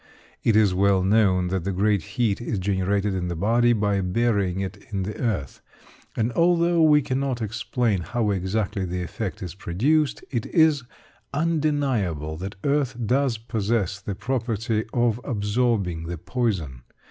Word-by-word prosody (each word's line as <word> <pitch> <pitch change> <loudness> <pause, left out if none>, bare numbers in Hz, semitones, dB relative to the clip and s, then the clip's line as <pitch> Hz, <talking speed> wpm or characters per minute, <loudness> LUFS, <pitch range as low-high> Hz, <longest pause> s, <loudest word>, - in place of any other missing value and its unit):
It 115 - +3
is 105 -3 +4
well 95 0 +3
known 95 -3 +3
that 95 0 -1
great 100 0 +2 0.2
heat 115 -3 +1
is 115 -2 -2
generated 100 +1 0
in 90 -1 -2
the 85 - -3
body 115 +7 +3
by 105 -3 +1
burying 95 -1 0
it 95 -1 -5
in 100 -3 -2
the 105 +3 -4
earth; 100 - -2 0.6
and 115 +2 +1
although 170 +1 +3
we 150 -2 +5
cannot 130 -1 -1
explain 110 -1 -1
how 110 +4 -1
exactly 100 +1 -1
the 90 0 -3
effect 95 +2 -5
is 90 -3 -6
produced, 135 - 0
it 120 -4 -2
is 160 -4 +4 0.5
undeniable 140 - 0
that 95 +4 -6
earth 140 -3 +1
does 130 +1 +1
possess 110 -3 -1
the 100 -1 -4
property 115 -1 -1
of 120 -1 +1
absorbing 105 - 0
the 85 0 -4
poison. 85 - -2
105 Hz, 145 wpm, -24 LUFS, 95-120 Hz, 0.6 s, we